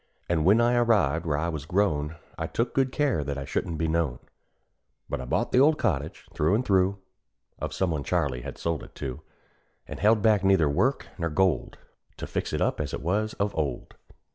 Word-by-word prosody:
And 85 Hz, -2 st, +1 dB
when 100 Hz, +5 st, +6 dB
I 120 Hz, +1 st, +3 dB
arrived 100 Hz, -, +2 dB
where 75 Hz, -2 st, +1 dB
I 85 Hz, +3 st, -1 dB
was 75 Hz, -3 st, -5 dB
grown, 85 Hz, -5 st, 0 dB, 0.2 s
I 80 Hz, 0 st, -3 dB
took 115 Hz, +7 st, -1 dB
good 135 Hz, -1 st, +1 dB
care 140 Hz, -, +1 dB
that 70 Hz, 0 st, -4 dB
I 70 Hz, -, -4 dB
shouldn't 80 Hz, +3 st, -2 dB
be 80 Hz, +1 st, 0 dB
known; 80 Hz, -5 st, 0 dB, 0.9 s
But -, -, -3 dB
I -, -, -6 dB
bought 65 Hz, -, -1 dB
the 125 Hz, -, +4 dB
old 150 Hz, +3 st, +5 dB
cottage, 80 Hz, -, -2 dB
through 80 Hz, +7 st, +2 dB
and 125 Hz, +4 st, 0 dB
through, 95 Hz, 0 st, +2 dB, 0.6 s
Of -, -, -3 dB
some 95 Hz, -3 st, 0 dB
one 75 Hz, -3 st, -2 dB
Charley 60 Hz, -1 st, 0 dB
had -, -, -7 dB
sold 85 Hz, -2 st, -2 dB
it -, -, -13 dB
to; 65 Hz, -2 st, -5 dB, 0.6 s
And -, -, -8 dB
held 105 Hz, 0 st, +3 dB
back 105 Hz, -3 st, +4 dB
neither 95 Hz, -5 st, +4 dB
work 125 Hz, -, +1 dB
nor 85 Hz, -1 st, 0 dB
gold, 85 Hz, -2 st, +1 dB, 0.4 s
To -, -, -5 dB
fix -, -, -3 dB
it -, -, -2 dB
up -, -, +1 dB
as 75 Hz, -, -3 dB
it -, -, -7 dB
was 105 Hz, +6 st, 0 dB
of 100 Hz, +1 st, -1 dB
old. 70 Hz, -6 st, -3 dB
85 Hz, 210 wpm, -27 LUFS, 75-105 Hz, 0.9 s, when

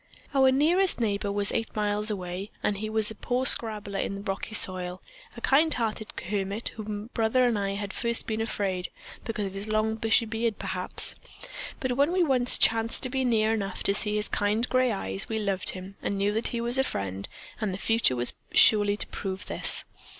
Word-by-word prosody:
"Our 265 Hz, -1 st, +5 dB
nearest 335 Hz, +7 st, +2 dB
neighbor 205 Hz, -3 st, -1 dB
was 205 Hz, 0 st, +2 dB
eight 225 Hz, -1 st, -3 dB
miles 210 Hz, 0 st, -1 dB
away, 185 Hz, 0 st, -5 dB
and 205 Hz, -, 0 dB
he 215 Hz, +2 st, -4 dB
was 220 Hz, -1 st, +3 dB
but 220 Hz, -, -6 dB
a -, -, -32 dB
poor 250 Hz, +1 st, -1 dB
scrabbler 210 Hz, -5 st, +3 dB
in 195 Hz, -, -2 dB
the 200 Hz, -, -7 dB
rocky 200 Hz, +1 st, -4 dB
soil, 185 Hz, -2 st, +2 dB, 0.4 s
a -, -, -8 dB
kind 310 Hz, +4 st, +3 dB
hearted 220 Hz, -4 st, -1 dB, 0.2 s
hermit 200 Hz, +2 st, -2 dB
of 215 Hz, -2 st, -8 dB
whom 210 Hz, +2 st, -6 dB
Brother 230 Hz, +2 st, +2 dB
and 235 Hz, -4 st, +1 dB
I 195 Hz, 0 st, -2 dB
had 200 Hz, 0 st, -4 dB
at -, -, -12 dB
first 235 Hz, -1 st, 0 dB
been 220 Hz, 0 st, -2 dB
afraid, 195 Hz, -5 st, -2 dB, 0.4 s
because 215 Hz, -3 st, -3 dB
of 190 Hz, -, -5 dB
his 195 Hz, +2 st, -6 dB
long 215 Hz, +1 st, +1 dB
bushy 225 Hz, +1 st, +2 dB
beard, 225 Hz, 0 st, -2 dB
perhaps, 185 Hz, -2 st, -2 dB, 0.7 s
but 260 Hz, -, -2 dB
when 285 Hz, +5 st, +2 dB
we 365 Hz, 0 st, +2 dB
once 255 Hz, -5 st, +4 dB
chanced 225 Hz, 0 st, +2 dB
to 255 Hz, -, +4 dB
be 265 Hz, 0 st, 0 dB
near 225 Hz, -3 st, +2 dB
enough 195 Hz, -4 st, -3 dB
to 200 Hz, -, +3 dB
see 210 Hz, +1 st, 0 dB
his 210 Hz, 0 st, 0 dB
kind 215 Hz, +4 st, 0 dB
gray 255 Hz, -1 st, +2 dB
eyes, 95 Hz, -, -1 dB
we 220 Hz, -, -1 dB
loved 200 Hz, -3 st, 0 dB
him 190 Hz, +1 st, -8 dB
and 200 Hz, -, -2 dB
knew 200 Hz, +1 st, +1 dB
that 225 Hz, +2 st, -1 dB
he 235 Hz, -, -3 dB
was 240 Hz, +2 st, 0 dB
a -, -, +4 dB
friend, 100 Hz, -, -4 dB, 0.3 s
and 215 Hz, -4 st, -1 dB
the 185 Hz, -, -4 dB
future 225 Hz, -, +1 dB, 0.4 s
surely 205 Hz, -2 st, +6 dB
was 205 Hz, -, -6 dB
to -, -, +2 dB
prove 190 Hz, 0 st, -5 dB
this. -, -, +3 dB
215 Hz, 215 wpm, -27 LUFS, 200-235 Hz, 0.7 s, surely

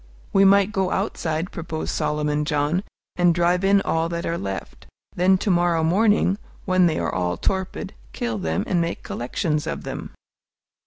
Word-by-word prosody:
"We 195 Hz, 0 st, +5 dB
might 200 Hz, +1 st, +5 dB
go 190 Hz, -3 st, 0 dB
outside," 170 Hz, -4 st, -2 dB
proposed 160 Hz, -1 st, -4 dB
Solomon 150 Hz, 0 st, 0 dB
John, 150 Hz, +4 st, 0 dB, 0.3 s
"and 175 Hz, -2 st, +4 dB
drive 175 Hz, +2 st, +2 dB
in 195 Hz, 0 st, +4 dB
all 165 Hz, -2 st, 0 dB
that 170 Hz, 0 st, -3 dB
are 165 Hz, -, -1 dB
left. 95 Hz, -, -6 dB, 0.3 s
Then 185 Hz, +2 st, +4 dB
to 200 Hz, +2 st, 0 dB
morrow 175 Hz, -2 st, +2 dB
morning, 205 Hz, +3 st, +3 dB, 0.3 s
when 185 Hz, -2 st, +4 dB
they 160 Hz, -, 0 dB
are 85 Hz, -3 st, -1 dB
all 90 Hz, -1 st, -1 dB
torpid, 190 Hz, -, -2 dB, 0.2 s
kill 115 Hz, -3 st, -3 dB
them 80 Hz, -2 st, -1 dB
and 175 Hz, -2 st, +1 dB
make 170 Hz, 0 st, -3 dB
collections 150 Hz, +5 st, -2 dB
of -, -, -4 dB
them." -, -, -6 dB
170 Hz, 165 wpm, -23 LUFS, 150-190 Hz, 0.3 s, We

